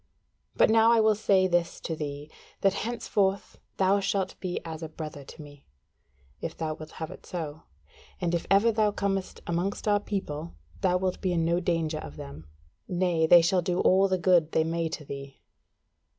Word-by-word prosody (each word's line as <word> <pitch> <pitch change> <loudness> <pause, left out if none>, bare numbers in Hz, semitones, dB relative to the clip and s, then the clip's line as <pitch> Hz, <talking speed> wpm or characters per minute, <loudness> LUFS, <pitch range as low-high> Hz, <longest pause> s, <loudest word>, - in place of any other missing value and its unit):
But - - +4
now 225 +1 +6
I 235 - +5
will 220 0 +5
say 195 -2 +3
this 175 -2 0
to 165 - -3
thee, 145 0 -6 0.3
that 195 -1 +3
henceforth 200 -3 -1 0.2
thou 195 +1 +3
shalt 195 -1 -1
be 180 -2 -3
as 160 -1 -6
a 160 - -5
brother 155 -2 -7
to 145 - -12
me, 145 -1 -14 0.8
if 165 - -5
thou 160 -1 -2
wilt 155 0 -10
have 160 -1 -6
it - - -12
so, 160 -3 -6 0.5
and 175 -1 -1
if 170 - -1
ever 200 +4 +5
thou 215 -1 +2
comest 195 -2 -2
amongst 175 +5 -2
our 205 -1 +4
people, 170 - -5 0.2
thou 180 -1 +2
wilt 185 0 -2
be 185 - 0
in 165 -1 +1
no 170 +1 +2
danger 165 -3 -1
of 75 - -9
them: 75 +1 -10 0.4
nay, 175 -3 +1
they 170 0 +8
shall 180 +2 +2
do 175 +1 -1
all 190 +1 +4
the 190 -1 +1
good 175 -3 +3
they 160 - +3
may 165 0 -1
to 155 -1 -6
thee." 140 0 -8
175 Hz, 190 wpm, -27 LUFS, 160-195 Hz, 0.8 s, they